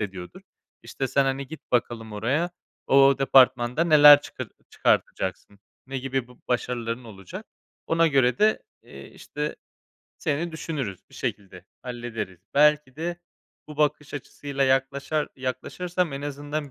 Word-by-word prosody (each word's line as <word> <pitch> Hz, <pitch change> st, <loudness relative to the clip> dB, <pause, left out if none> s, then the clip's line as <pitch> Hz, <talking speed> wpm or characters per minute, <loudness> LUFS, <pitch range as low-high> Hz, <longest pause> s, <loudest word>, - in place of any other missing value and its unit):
ediyordur. 95 Hz, -4 st, -6 dB, 0.4 s
İşte: 135 Hz, -, -4 dB
"Sen, 140 Hz, +2 st, +2 dB
hani, 135 Hz, +1 st, -2 dB
git 160 Hz, +3 st, -12 dB
bakalım 115 Hz, -3 st, -1 dB
oraya, 135 Hz, +12 st, 0 dB, 0.4 s
o 135 Hz, 0 st, +6 dB
departmanda 130 Hz, +1 st, +4 dB
neler 150 Hz, -3 st, +9 dB
çıkar -, -, -7 dB, 0.2 s
çıkartacaksın, 95 Hz, +2 st, -1 dB, 0.3 s
ne 135 Hz, 0 st, -4 dB
gibi 130 Hz, -1 st, -3 dB
b -, -, -14 dB, 0.2 s
başarıların 120 Hz, -1 st, -2 dB
olacak? 95 Hz, -5 st, -10 dB, 0.4 s
Ona 165 Hz, 0 st, +3 dB
göre 130 Hz, -5 st, +2 dB
de, 215 Hz, +1 st, +3 dB, 0.2 s
eee, -, -, -12 dB
işte, -, -, -5 dB, 0.6 s
seni 160 Hz, +1 st, -2 dB
düşünürüz. 140 Hz, -, -4 dB
Bir -, -, -17 dB
şekilde 95 Hz, -3 st, -5 dB, 0.2 s
hallederiz." 120 Hz, -7 st, -6 dB
Belki 150 Hz, -2 st, +4 dB
de, 170 Hz, +2 st, -3 dB, 0.5 s
bu 150 Hz, -, -9 dB
bakış 150 Hz, -1 st, 0 dB
açısıyla 140 Hz, 0 st, -3 dB
yaklaşar 135 Hz, +3 st, 0 dB
yaklaşırsam 170 Hz, +6 st, -3 dB
en 140 Hz, -, -5 dB
azından 145 Hz, +1 st, -4 dB
135 Hz, 130 wpm, -25 LUFS, 120-150 Hz, 0.6 s, neler